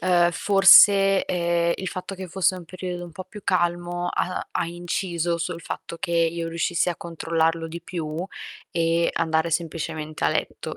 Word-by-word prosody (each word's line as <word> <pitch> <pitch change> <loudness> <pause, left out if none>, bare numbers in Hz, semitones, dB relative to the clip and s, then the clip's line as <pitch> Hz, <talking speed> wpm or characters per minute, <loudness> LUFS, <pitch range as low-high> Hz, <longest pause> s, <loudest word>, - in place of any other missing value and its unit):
ehm, 175 -1 +3
forse, 195 0 +6
ehm, 170 -1 +1
il 190 - -5
fatto 185 +1 -6
che 190 0 -7
fosse 185 +1 +1
un 175 -2 -9
periodo 180 0 -6
un 170 - -11
po' 185 +3 -8
più 210 +2 -11
calmo 175 0 0
ha 180 - -2
ha 170 - -1
inciso 175 0 -2
sul 165 0 -4
fatto 170 - -6
che 170 - -4
io 165 0 +1
riuscissi 170 +1 0
a 170 - -5
controllarlo 165 -1 -1
di 170 +1 -7
più 165 -1 -5 0.5
e 165 0 +1
andare 160 0 +1
semplicemente 160 -1 -3
a - - +4
letto - - -3
170 Hz, 165 wpm, -24 LUFS, 165-180 Hz, 0.5 s, forse